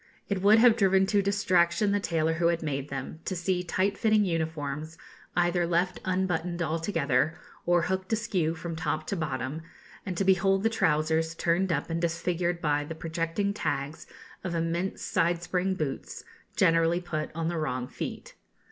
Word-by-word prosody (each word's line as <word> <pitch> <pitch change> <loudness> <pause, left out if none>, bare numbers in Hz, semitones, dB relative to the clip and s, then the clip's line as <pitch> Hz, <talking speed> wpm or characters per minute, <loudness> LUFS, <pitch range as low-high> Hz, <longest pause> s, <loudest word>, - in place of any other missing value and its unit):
It 200 -2 -1
would 205 +3 +6
have 230 0 +6
driven 195 -2 +4
to 200 +1 +2
distraction 195 0 +2
the 205 - +2
tailor 165 -4 0
who 170 +1 +2
made 140 -2 -3
them, 135 +3 -5
to 185 - -2
see 180 +1 0
tight 185 +3 0
fitting 215 -2 +3
uniforms 160 -2 -3 0.4
either 175 0 +2
left 175 +2 0
unbuttoned 180 -2 -1
altogether, 160 -3 0 0.3
or 175 -1 +4
hooked 190 +2 -2
askew 190 -8 0
from 165 0 -5
top 155 -1 -2
to 200 - -2
bottom, 140 -2 -3 0.4
and 185 -3 -4
to 195 - +2
behold 195 +1 +3
the 225 - +4
trousers 160 -4 +1
turned 175 +3 +1
up 165 - -1
and 165 0 -1
disfigured 170 0 -1
by 145 -1 +1
the 160 +2 -7
projecting 165 +5 -2
tags 145 -6 -3 0.4
of 180 -2 -3
immense 170 +3 -2
side 170 -1 +1
spring 185 +2 0
boots, 150 -6 -4 0.3
generally 165 +1 +3
put 160 -4 -3
on 165 -1 -1
the 170 0 -1
wrong 130 -5 -2
feet. - - -6
170 Hz, 165 wpm, -28 LUFS, 160-190 Hz, 0.4 s, would